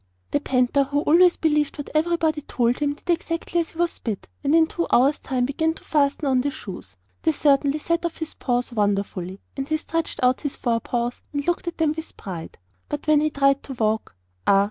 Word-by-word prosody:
The 290 - +2
panther, 265 0 +2
who 285 +2 0
always 345 +4 +5
believed 300 -2 +1
what 290 - -6
everybody 320 -1 +1
told 245 -3 0
him, 290 -1 0
did 295 - -25
exactly 335 0 -1
as 335 - -1
he - - -17
was 345 0 0
bid, 215 -5 -4 0.2
and 285 +2 +3
in 325 -1 +6
two 340 +1 -3
hours' 270 +4 +4
time 255 -2 -1
began 320 +4 0
to - - -14
fasten 290 0 +1
on 260 -2 +3
the 285 - 0
shoes. 180 - -9 0.2
They 320 - +3
certainly 285 -1 +3
set 335 +3 -1
off 340 -1 -3
his 320 -1 -4
paws 245 -1 -1
wonderfully, 200 -3 -1
and 270 0 -3
he 310 - +2
stretched 330 +1 -3
out 250 +1 +3
his 290 -3 -3
forepaws 240 0 -1
and 285 -1 -2
looked 345 0 -1
at 345 - -3
them 315 -2 +2
with 320 0 -7
pride. 175 -5 -7 0.3
But 295 - -4
when 305 -1 +4
he 310 - +2
tried 275 -1 +2
to 270 - -7
walk 220 - -1 0.3
ah! 195 - +6
285 Hz, 210 wpm, -24 LUFS, 245-320 Hz, 0.3 s, in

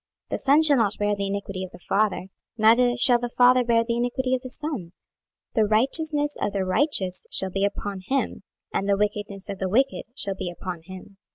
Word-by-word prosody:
The - - -2
son 285 +3 +4
shall 295 -3 +5
not 215 -4 +1
bear 205 0 +1
the 200 0 -3
iniquity 195 -1 -4
of 185 - -6
the - - -13
father, 195 -1 0 0.3
neither 240 +3 +4
shall 245 -1 +4
the 240 0 -3
father 250 +1 +5
bear 230 -1 +3
the 235 0 -2
iniquity 255 +2 -1
of 255 - 0
the 255 - -8
son: 260 - -5 0.6
the 220 - +3
righteousness 290 +7 +2
of 205 - -1
the 195 -2 -1
righteous 185 - 0
shall 190 -1 +2
be 195 +2 -1
upon 200 -1 -2
him, 275 0 -1 0.3
and 195 - -1
the 200 - +3
wickedness 205 -1 -3
of 195 - -6
the 190 - -1
wicked 265 +7 +1
shall 200 - -1
be 185 -2 -5
upon 175 -1 -6
him. 190 +1 -11
215 Hz, 205 wpm, -24 LUFS, 195-255 Hz, 0.6 s, shall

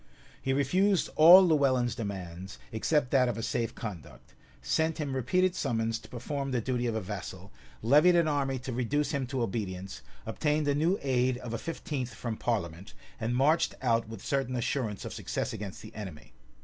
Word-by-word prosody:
He 135 - -1
refused 180 +8 +2
all 175 +5 +9
Lewellyn's 130 -6 +2
demands, 95 -4 -6
except 125 +4 +1
that 130 -3 +4
of 120 - -3
a 115 - -4
safe 115 +1 -2
conduct; 95 - -8 0.3
sent 160 - 0
him 145 -4 -3
repeated 175 +9 +2
summons 115 -7 -1
to 110 - -15
perform 135 +3 -4
the 125 -2 0
duty 125 +1 -1
of 115 - -1
a 110 - -1
vassal; 95 -1 -7 0.3
levied 150 +9 +6
an 170 -2 +4
army 140 -3 0
to 125 0 -5
reduce 130 +5 0
him 140 -4 -1
to 130 -2 -1
obedience; 95 -4 -4 0.2
obtained 150 +6 0
a 145 - +3
new 165 +7 +2
aid 130 -2 +1
of 125 -2 -7
a 115 - -2
fifteenth 140 -5 -4
from 115 -3 -4
parliament; 95 -6 -3 0.2
and 115 +1 -1
marched 150 +6 +3
out 115 -3 +1
with 110 -3 -9
certain 135 -2 -1
assurance 120 -4 -2
of - - -5
success - - -3
against 100 -2 -7
the 110 - -11
enemy. 80 - -9
125 Hz, 180 wpm, -29 LUFS, 110-145 Hz, 0.3 s, all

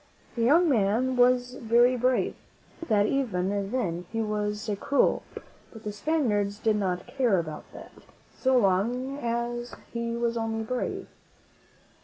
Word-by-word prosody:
The 235 - -2
young 315 +9 +5
man 245 0 +2
was 250 0 +3
very 240 +1 +3
brave. 250 +1 +1
I - - -30
think 330 - -9
that, 205 -1 +4
even 200 -6 -1
then, 180 -9 -2
he 225 - -2
was 210 0 -2
cruel, 280 - +2 0.5
but 220 -1 -12
the 210 - -3
Spaniards 210 -6 0
did 220 -1 +1
not 185 -3 -1
care 245 -5 +1
about 155 -3 -5
that, - - -11 0.4
so 260 -1 +2
long 245 +7 +1
as 240 0 -3 0.2
he 235 0 -2
was 235 0 -1
only 225 0 -2
brave. 250 +3 -3
235 Hz, 145 wpm, -27 LUFS, 205-250 Hz, 0.5 s, young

